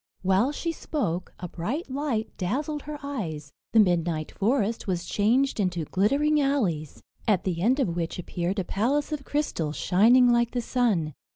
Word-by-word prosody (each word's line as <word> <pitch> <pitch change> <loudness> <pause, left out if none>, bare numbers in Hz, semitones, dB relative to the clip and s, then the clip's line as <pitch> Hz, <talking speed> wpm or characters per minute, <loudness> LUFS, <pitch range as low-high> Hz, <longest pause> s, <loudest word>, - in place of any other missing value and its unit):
While 195 +8 +3
she 335 +3 -2
spoke, 185 - -3
a 180 - -5
bright 220 - -4
light 265 -6 -2
dazzled 290 - -2
her 300 +1 -6
eyes, 165 - -5 0.2
the 225 - +5
midnight 170 -5 +2
forest 225 +1 0
was 180 -2 -1
changed 235 +8 +1
into 180 -5 0
glittering 285 - +2
alleys, 195 - -1 0.2
at 205 -5 +3
the 175 -3 -2
end 250 +8 +3
of 180 -11 0
which 165 -1 -3
appeared 180 +2 -3
a 190 - 0
palace 265 - 0
of 300 -2 -3
crystal, 275 - -1
shining 240 +10 +5
like 235 0 +2
the 245 - 0
sun. 215 - 0
215 Hz, 165 wpm, -26 LUFS, 175-275 Hz, 0.2 s, the